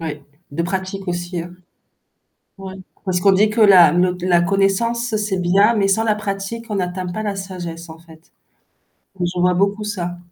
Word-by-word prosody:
Ouais, 150 -3 -6 0.3
de 145 +4 -2
pratique 190 +2 -4
aussi. 175 0 -3 1.2
Ouais. 190 -1 -8 0.3
Parce 185 -2 -1
qu'on 195 - +5
dit 210 +3 +3
que 220 +2 -2
la 185 -7 +7
le 180 +1 +1
la 175 -1 +3
connaissance 200 +5 0
c'est 210 -2 -2
bien, 195 +6 +3
mais 200 - +2
sans 195 +3 +2
la 215 -2 +2
pratique 210 +2 -5
on - - -2
n'atteint 180 0 -3
pas 180 +5 -4
la 205 -2 -3
sagesse 175 -3 -7
en 160 0 -11
fait. 160 -1 -19 0.9
Je 175 0 -2
vois 180 0 +3
beaucoup 200 +3 0
ça. 180 -4 -4
190 Hz, 175 wpm, -19 LUFS, 175-205 Hz, 1.2 s, la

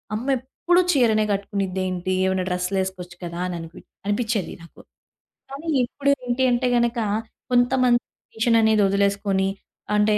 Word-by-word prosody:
అమ్మెప్పుడు 265 +8 +1
చీరనే 220 -5 +3
గట్టుకునిద్దేంటి? 190 -2 -2
ఏవైనా 190 -1 0
డ్రెస్సు‌లేసుకోవచ్చు 180 0 -3
కదా! 170 0 -5
అననిపిచి 170 -2 -8 0.2
అనిపిచ్చేది 215 -1 -1
నాకు. 170 - -16 0.7
కానీ 280 +4 -8 0.2
ఇప్పుడు 280 +3 0
ఏంటి 245 +1 0
అంటే 245 +1 +1
గనక, 235 0 +1 0.5
కొంతమంది 245 0 +3 0.2
ట్రెడిషన్ 230 +1 +1
అనేదొదిలేసుకొని, 200 -2 +2 0.5
అంటే 210 0 +3
210 Hz, 105 wpm, -23 LUFS, 190-245 Hz, 0.7 s, చీరనే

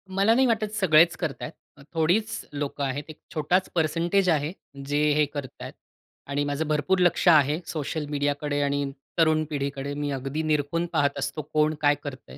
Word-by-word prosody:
मला 200 +3 +4
नाही 260 +3 +4
वाटत 220 -3 0
सगळेच 170 -4 +5
करत 160 -6 -4
आहेत. 145 -2 -11
थोडीच 180 +7 0
लोकं 145 0 -3
आहेत. 140 +2 -2
एक 155 - -10 0.2
छोटाच 175 +4 +1
पर्सेंटेज 170 +4 +1
आहे 155 -1 +1 0.3
जे 145 +1 -1 0.2
हे 150 0 +3
करत 145 -2 -8
आहेत. - - -7 0.5
आणि 140 +1 -1
माझं 145 +2 -2
भरपूर 155 +5 +1
लक्ष 180 0 +2
आहे, 150 -2 +5
सोशल 155 0 -3
मीडियाकडे 145 0 -1
आणि 140 0 0 0.3
तरुण 160 -1 +3
पिढीकडे 140 -1 -3
मी 145 0 -3
अगदी 135 +3 -3
निरखून 155 +2 0
पाहत 145 -3 +1
असतो 145 +2 -3
कोण 155 0 +3
काय 145 0 +4
करतंय. 130 - -9
150 Hz, 170 wpm, -26 LUFS, 145-165 Hz, 0.5 s, सगळेच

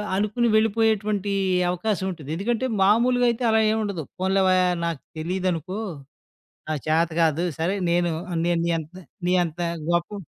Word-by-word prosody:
అనుకుని 215 +4 +1
వెళ్ళిపోయేటువంటి 215 -2 +1 0.4
అవకాశం 190 +2 -1
ఉంటది. 155 -5 -10
ఎందుకంటే 235 +7 -1 0.2
మామూలుగా 245 +5 +4
అయితే 235 +1 -2
అలా 220 - +4
ఏమి 220 - 0
ఉండదు. 190 -7 -3 0.2
పోన్‌లే 190 +1 +2
వయ్యా 185 0 +4 0.2
నాకు 165 -4 -3 0.2
తెలీదనుకో. 185 +2 -2 0.9
నా 155 - 0
చాత 165 +2 +2
కాదు 160 +1 +2
సరే 175 +5 0 0.2
నేను 175 0 +2 0.4
నేను 175 -1 +2
నీ - - +1
అంత 155 +3 -11 0.3
నీ 180 - +2
అంత 170 +1 -6 0.3
గొప్ప 175 +4 -1
190 Hz, 145 wpm, -24 LUFS, 170-215 Hz, 0.9 s, మామూలుగా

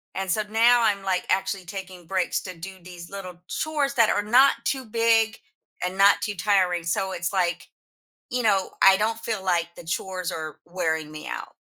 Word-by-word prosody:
And 190 0 -3
so 215 - +1
now 235 +2 +5
I'm, 200 -3 +1
like, 185 -2 0
actually 190 0 0
taking 185 -1 -8
breaks 185 0 0
to 185 -1 -7
do 190 +3 -9
these 175 -1 -11
little 190 -3 -7
chores 295 -3 -1
that 230 -3 +5
are 205 - +1
not 250 +6 +6
too 265 0 -1
big 225 0 +2 0.5
and 180 +1 -4
not 200 +1 +6
too 210 -2 -2
tiring. 180 -3 +2
So 185 +3 -1
It's, 175 -2 -2
like, 175 -2 0 0.6
you 250 0 -1
know, 195 -4 +2
I 195 0 +8
don't 225 +2 0
feel, 220 -4 -3
like, 170 -2 +1
the - - -12
chores 185 +1 -3
are 155 -1 -6
wearing 160 -3 -2
me 155 0 -8
out - - -6
190 Hz, 190 wpm, -25 LUFS, 180-220 Hz, 0.6 s, I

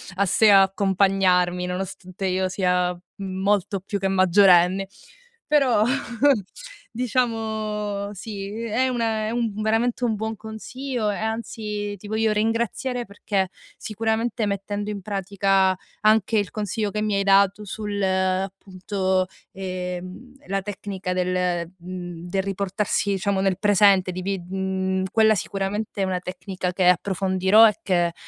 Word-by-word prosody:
a 200 +2 +2
se 210 +3 +5
accompagnarmi, 190 -2 +3
nonostante 185 +1 -5
io 185 0 0
sia 180 -1 0 0.2
molto 195 0 -1
più 200 +1 -4
che 195 - 0
maggiorenne. 190 0 +4 0.6
Però 270 -8 +3 1.1
diciamo 220 -4 -2
sì, 200 0 -6
è 230 +3 0
un 250 -2 -2
è 220 -1 0
un 235 -2 -1
veramente 225 +3 +1
un 225 - +1
buon 220 +1 -3
consiglio 225 +2 -4
e 205 - -1
anzi 215 -2 -4
ti 205 - -11
voglio 220 +1 +1
ringraziare 235 +3 -1
perché 200 -1 -2 0.3
sicuramente, 225 +1 -1
mettendo 205 +1 -3
in 200 -1 -5
pratica 195 -1 +1 0.3
anche 220 0 +3
il 205 -2 0
consiglio 210 -1 -2
che 210 - -2
mi 215 -1 0
hai 200 - +1
dato 200 +1 +3
sul, 205 0 -4
appunto, 190 0 -1 0.3
ehm, 185 +5 -6
la 195 0 -1
tecnica 190 -2 -5
del, 180 -2 0
mhmm, 175 -1 -7
del 190 0 0
riportarsi, 200 +1 -1
diciamo, 195 0 0
nel 190 -2 +1
presente, 200 -2 +4
di 185 - -5
vi 195 +1 -2
mhmm, 190 +1 -2
quella 220 -1 +5
sicuramente 200 +1 -3
è - - +2
una 185 -1 -1
tecnica 180 0 -4
che 185 -1 +2
approfondirò 190 +3 +4
e 215 0 -1
che, 175 -4 +1
200 Hz, 130 wpm, -23 LUFS, 185-215 Hz, 1.1 s, se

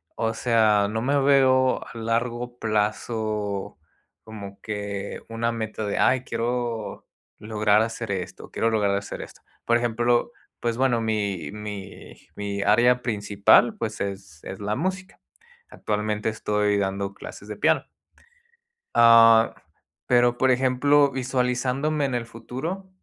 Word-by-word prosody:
O 115 0 -1
sea, 110 -4 +3
no 110 +1 -2
me 140 +4 +1
veo 130 -2 +3
a 115 - -11
largo 120 +2 -2
plazo 105 -1 -2 0.5
como 100 -3 -10
que 100 -2 -5
una 115 +1 -1
meta 110 -1 -4
de: 100 - -2
"Ay, 130 -1 +3
quiero 115 -2 -3 0.3
lograr 105 -1 +2
hacer 115 -1 -3
esto 90 -2 -5
quiero 115 - 0
lograr 105 -3 +1
hacer 100 0 -5
esto". - - -12 0.2
Por 120 0 +3
ejemplo, 120 - +1 0.3
pues 115 0 -1
bueno, 130 -3 +2
mi 100 -8 -2
mi 105 -2 -8 0.2
mi 100 -1 -4
área 120 +4 +4
principal, 105 -4 +3
pues - - -4
es 95 -5 -6
es 95 - -7
la 105 +1 -2
música. 185 +5 -4 0.5
Actualmente, 105 0 -2
estoy 105 -1 0
dando 100 0 -2
clases - - -10
de - - -6
piano. - - +2 1.1
Ah, 115 -1 +7 0.5
pero, 120 0 +3
por 130 +1 +3
ejemplo, 135 +3 +3
visualizándome 130 +3 -1
en 135 -2 -1
el 120 -1 -2
futuro, 155 +12 -6
115 Hz, 130 wpm, -24 LUFS, 105-125 Hz, 1.1 s, Ah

